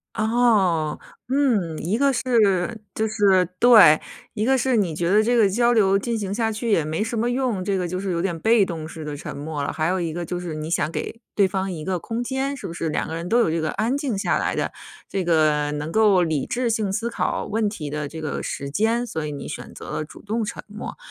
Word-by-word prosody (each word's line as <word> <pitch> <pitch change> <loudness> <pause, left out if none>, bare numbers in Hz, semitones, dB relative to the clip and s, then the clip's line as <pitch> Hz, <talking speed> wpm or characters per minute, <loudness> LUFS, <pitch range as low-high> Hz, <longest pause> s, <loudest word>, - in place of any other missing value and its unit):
哦。 215 -8 +2 0.3
嗯， 225 - +1
一 185 +7 -1
个 275 +1 +3
是 225 -4 +2
就 220 0 0
是 195 -4 +3
对。 220 -11 +8 0.4
一 215 +1 0
个 265 +1 +3
是 260 0 +1
你 175 -7 0
觉 170 +1 -1
得 210 +2 +5
这 240 +2 +2
个 215 - +5
交 240 +4 +3
流 195 -3 +4
进 230 +3 -2
行 200 -2 -3
下 225 0 0
去 225 +1 -2
也 165 -6 +3
没 160 +7 -2
什 230 0 -3
么 235 +2 +1
用， 245 -7 -1
这 195 0 0
个 180 -1 -1
就 185 +2 -3
是 195 -1 -2
有 170 - -1
点 175 -3 -1
被 220 +1 +4
动 160 -3 -5
式 160 -3 -8
的 150 -1 -4
沉 - - -7
默 145 0 -4
了。 - - -2
还 155 0 -1
有 185 +1 0
一 165 -2 -2
个 175 +1 -4
就 175 +2 -4
是 170 -3 -5
你 155 +1 -5
想 165 -3 0
给 230 - -5 0.2
对 200 -2 +4
方 190 0 -2
一 155 -3 -6
个 185 -1 0
空 230 +7 -3
间， 270 +2 -2
是 - - -6
不 165 - -7
是 165 -2 -3
两 - - -1
个 160 - -4
人 170 +2 -5
都 240 - +4
有 230 - +3
这 165 - 0
个 155 - -1
安 235 +5 0
静 270 -8 -2
下 195 - +1
来 - - -1
的， - - -1 0.4
这 190 -2 -2
个 155 -3 +2
能 150 +2 -4
够 205 -4 +4
理 155 -4 -1
智 245 -1 -1
性 220 -3 0
思 230 +4 -1
考 - - -1
问 215 0 0
题 155 -8 -6
的 150 -1 -3
这 160 +2 -8
个 155 - -3
时 140 - -4
间， 225 +6 +1
所 160 -9 -4
以 150 - -4
你 140 -1 -6
选 - - -7
择 - - -10
了 - - -2
主 150 - -13
动 220 +2 -2
沉 - - -6
默。 210 +1 -8
195 Hz, 275 characters per minute, -23 LUFS, 165-230 Hz, 0.4 s, 对